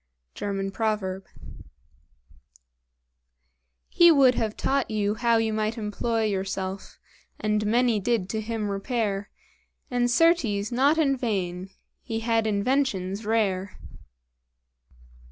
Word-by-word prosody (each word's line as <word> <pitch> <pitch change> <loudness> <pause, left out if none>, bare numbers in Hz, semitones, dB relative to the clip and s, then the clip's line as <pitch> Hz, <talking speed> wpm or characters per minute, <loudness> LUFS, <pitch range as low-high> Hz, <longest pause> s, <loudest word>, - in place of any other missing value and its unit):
German 195 -1 -3
Proverb. 195 -3 -2 2.6
"He 345 -1 +6
would 270 -5 +5
have 220 -3 -2
taught 275 -1 0
you 210 -1 0
how 235 +1 +2
you 225 -1 0
might 215 +2 -1
employ 225 +1 -1
Yourself; 195 -1 -3 0.4
and 210 0 0
many 235 0 +2
did 215 -2 0
to 220 +1 -2
him 215 -2 -3
repair, 205 -1 -2 0.6
And, 245 0 +1
certes, 240 -9 +2
not 275 +6 +3
in 280 -4 +2
vain; 190 -7 -3 0.3
he 225 -2 -4
had 225 -1 +1
inventions 210 -3 -1
rare." 200 -4 0
220 Hz, 105 wpm, -26 LUFS, 200-240 Hz, 2.6 s, He